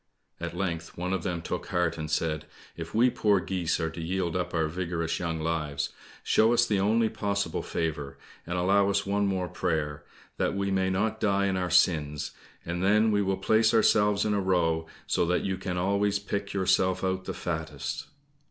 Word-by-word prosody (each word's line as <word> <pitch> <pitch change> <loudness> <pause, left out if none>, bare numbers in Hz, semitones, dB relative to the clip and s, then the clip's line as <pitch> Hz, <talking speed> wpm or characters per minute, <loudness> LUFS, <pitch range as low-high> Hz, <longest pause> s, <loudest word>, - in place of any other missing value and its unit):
At 85 0 -5
length 85 -3 -3
one 90 +2 -2
of 95 - -1
them 85 -2 -3
took - - -4
heart 90 -2 0
and 80 -1 -5
said, 75 0 -1 0.3
"If 85 +2 -7
we 120 +3 +5
poor 105 -4 +3
geese 90 -2 -1
are 80 -1 -1
to 85 - -7
yield 85 0 -1
up 90 -1 -1
our 80 -3 +1
vigorous 85 0 -2
young 85 -2 -2
lives, 75 -3 -1 0.3
show 110 +2 +4
us 120 0 +4
the 105 -4 +1
only 110 +3 +3
possible 100 -5 -2
favour 75 -4 -3 0.3
and 90 +1 -2
allow 100 +2 +3
us 100 0 +1
one 100 +1 +1
more 95 -2 -1
prayer, 80 -5 -2 0.3
that - - 0
we 100 0 -1
may 95 -1 +1
not 110 +4 0
die 100 -2 +2
in 95 -1 0
our 90 -1 -1
sins, 75 -5 +2 0.3
and 85 +2 -2
then 105 +3 +4
we 105 -1 +2
will 95 -1 0
place 110 +4 +3
ourselves 105 -2 +4
in 105 - +1
a 100 - +1
row, 85 -4 +1 0.2
so - - +1
that 90 +1 +1
you 95 - -1
can 90 -1 -4
always 100 +2 +1
pick 100 0 -4
yourself 95 -1 +2
out 95 0 -1
the - - -3
fattest." 80 -5 -4
95 Hz, 195 wpm, -28 LUFS, 85-100 Hz, 0.3 s, we